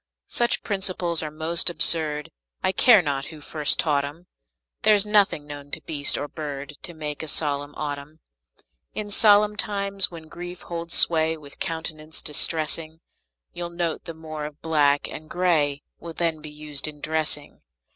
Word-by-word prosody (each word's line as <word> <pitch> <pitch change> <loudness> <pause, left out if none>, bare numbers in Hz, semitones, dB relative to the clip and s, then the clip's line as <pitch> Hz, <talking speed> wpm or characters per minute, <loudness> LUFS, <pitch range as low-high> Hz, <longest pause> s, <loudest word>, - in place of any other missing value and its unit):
Such 240 -1 0
principles 185 -4 +1
are 155 - -4
most 160 +3 +2
absurd, 155 -3 +4 0.3
I - - +2
care 215 -1 +6
not 140 -2 -2
who 155 - -10
first 150 0 +3
taught 145 -3 +1
'em; 150 +5 -8 0.6
There's 210 -1 +4
nothing 205 -8 +2
known 145 -1 -9
to 160 - -1
beast 145 -2 -1
or 145 - -4
bird 145 -2 -7
To 175 - -6
make 150 -2 -5
a 160 - -7
solemn 145 -1 -1
autumn. 145 +1 -6 0.8
In 210 -1 -4
solemn 210 0 +5
times, 200 -2 +3
when 165 -2 -11
grief 175 +2 -9
holds 170 0 -4
sway 160 -1 +4
With 145 -2 -13
countenance 160 -3 -4
distressing, 155 +1 -2 0.5
You'll 175 0 -4
note 170 -2 -3
the 165 - -7
more 155 -1 -7
of 150 0 -9
black 145 -3 +2
and 155 0 -9
gray 155 -6 +1 0.2
Will 170 -1 -8
then 165 -2 -1
be 155 - -9
used 150 -1 -2
in 150 -1 -7
dressing. 155 -1 -3
160 Hz, 160 wpm, -24 LUFS, 150-175 Hz, 0.8 s, care